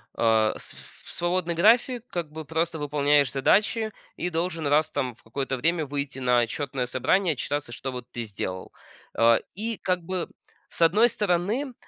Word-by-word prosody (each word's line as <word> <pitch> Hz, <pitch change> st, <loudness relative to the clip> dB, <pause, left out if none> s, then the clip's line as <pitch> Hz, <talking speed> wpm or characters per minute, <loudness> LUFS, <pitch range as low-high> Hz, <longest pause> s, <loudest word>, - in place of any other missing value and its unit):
а, 110 Hz, -1 st, +3 dB
с -, -, -10 dB
ф -, -, -16 dB
свободный 175 Hz, 0 st, -1 dB
график, 235 Hz, +6 st, +3 dB
как 165 Hz, -4 st, -4 dB
бы 160 Hz, 0 st, -6 dB
просто 160 Hz, +1 st, -1 dB
выполняешь 145 Hz, -2 st, +2 dB
задачи 215 Hz, -, +2 dB, 0.2 s
и 180 Hz, -, -2 dB
должен 165 Hz, -2 st, -2 dB
раз 155 Hz, +2 st, +3 dB
там 130 Hz, -5 st, -2 dB
в -, -, -23 dB
какое-то 135 Hz, +4 st, -3 dB
время 160 Hz, +4 st, 0 dB
выйти 140 Hz, -1 st, -4 dB
на 125 Hz, -1 st, +3 dB
отчетное 130 Hz, +1 st, -2 dB
собрание, 165 Hz, +8 st, +1 dB
отчитаться, 145 Hz, -1 st, -3 dB
что 135 Hz, +2 st, -5 dB
вот 125 Hz, -1 st, -8 dB
ты 120 Hz, -, -4 dB
сделал. 95 Hz, -3 st, -5 dB, 0.4 s
А 115 Hz, 0 st, +6 dB, 0.2 s
и 220 Hz, +2 st, -3 dB
как 180 Hz, -2 st, -1 dB
бы 185 Hz, 0 st, -3 dB, 0.4 s
с -, -, -8 dB
одной 205 Hz, +9 st, +6 dB
стороны, 210 Hz, +7 st, -1 dB
155 Hz, 165 wpm, -26 LUFS, 130-180 Hz, 0.4 s, А